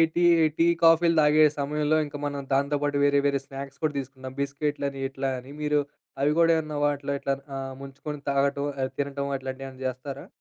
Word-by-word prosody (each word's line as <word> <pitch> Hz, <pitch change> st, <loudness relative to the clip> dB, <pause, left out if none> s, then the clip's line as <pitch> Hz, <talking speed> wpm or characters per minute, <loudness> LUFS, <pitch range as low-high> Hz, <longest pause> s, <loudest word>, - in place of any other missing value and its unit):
Tea 175 Hz, -, +2 dB, 0.3 s
tea, 165 Hz, -, +5 dB, 0.2 s
కాఫీలు 165 Hz, 0 st, +5 dB
తాగే 150 Hz, +1 st, +5 dB
సమయంలో 150 Hz, +2 st, +1 dB
ఇంక 145 Hz, 0 st, -7 dB
మనం 145 Hz, -1 st, -2 dB
దాంతో 140 Hz, +2 st, +2 dB
పాటు 145 Hz, -1 st, 0 dB
వేరే 140 Hz, 0 st, +4 dB
వేరే 140 Hz, -1 st, +2 dB
స్నాక్స్ 135 Hz, 0 st, -8 dB
కూడా 155 Hz, -1 st, +1 dB
తీసుకుందాం 130 Hz, -1 st, -7 dB
బిస్కెట్‌లని 140 Hz, 0 st, -2 dB
ఇట్లా 135 Hz, 0 st, -2 dB
అని 130 Hz, +2 st, -10 dB
మీరు 150 Hz, -1 st, +2 dB, 0.4 s
అవి 145 Hz, -, +3 dB
కూడా 165 Hz, 0 st, +5 dB
ఏమన్నా 155 Hz, -2 st, -3 dB
వాటిలో 140 Hz, -1 st, -1 dB
ఇట్లా 140 Hz, -, -1 dB, 0.2 s
అ -, -, -3 dB, 0.2 s
ముంచుకొని 140 Hz, +2 st, -7 dB
తాగటం, 140 Hz, +1 st, +1 dB, 0.2 s
ఆహ్, 130 Hz, -, -1 dB
తినటం 140 Hz, 0 st, -2 dB
అట్లాంటియేమన్నా 130 Hz, 0 st, -7 dB
చేస్తారా? 130 Hz, +2 st, -5 dB
140 Hz, 175 wpm, -26 LUFS, 135-150 Hz, 0.4 s, Tea